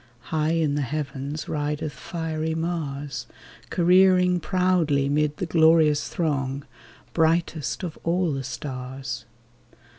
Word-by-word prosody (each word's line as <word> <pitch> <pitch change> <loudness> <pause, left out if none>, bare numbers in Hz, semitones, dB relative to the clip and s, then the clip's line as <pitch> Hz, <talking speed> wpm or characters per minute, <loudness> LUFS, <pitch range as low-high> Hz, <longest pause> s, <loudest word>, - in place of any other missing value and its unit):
High 155 +1 +2
in 160 -3 +1
the 145 - 0
heavens 145 +1 -4
rideth 150 0 -2
fiery 160 -1 -3
Mars, 145 -6 -3 0.4
Careering 180 0 +4
proudly 170 -5 +2
'mid 150 0 +1
the - - -2
glorious 160 -3 +4
throng. 140 -4 -1 0.5
Brightest 165 0 +1
of 170 -4 -5
all 175 0 +1
the 135 0 -3
stars. 130 -2 -5
155 Hz, 110 wpm, -25 LUFS, 140-165 Hz, 0.5 s, Careering